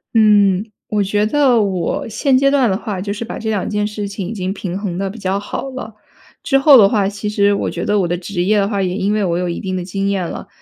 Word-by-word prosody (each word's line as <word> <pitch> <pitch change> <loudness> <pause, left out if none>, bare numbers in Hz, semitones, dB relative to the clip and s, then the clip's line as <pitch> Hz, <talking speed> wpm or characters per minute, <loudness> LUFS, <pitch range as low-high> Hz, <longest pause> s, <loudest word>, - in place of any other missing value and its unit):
嗯， 210 -1 +4 0.2
我 210 -1 0
觉 205 +2 0
得 255 -2 +3
我 190 -4 -2
现 265 +4 +1
阶 275 +1 +4
段 275 -3 +3
的 190 - +1
话， 205 -2 -4
就 200 +2 -3
是 210 - -5
把 230 - -6
这 220 - -4
2 210 -4 -1
件 210 -1 -1
事 210 -1 -4
情 195 -2 -5
已 215 - -5
经 185 -3 -3
平 190 -2 -4
衡 190 -4 -4
得 195 +1 -2
比 220 +4 -9
较 195 0 -1
好 205 +6 -5
了。 255 -4 -7 0.5
之 270 - +2
后 275 -1 +7
的 200 -2 +6
话， 205 -3 +1
其 205 +1 -4
实 205 -1 +2
我 200 - -1
觉 - - -4
得 210 0 +2
我 180 - +1
的 175 +1 -1
职 180 0 -4
业 210 +3 +2
的 200 -1 +2
话， 200 -1 -1
也 180 -1 -1
因 200 +1 0
为 215 -1 0
我 175 -2 0
有 180 - -1
一 170 - -3
定 185 -1 -3
的 180 - -4
经 195 +2 -2
验 190 -3 -1
了， - - -7
205 Hz, 295 characters per minute, -18 LUFS, 190-215 Hz, 0.5 s, 后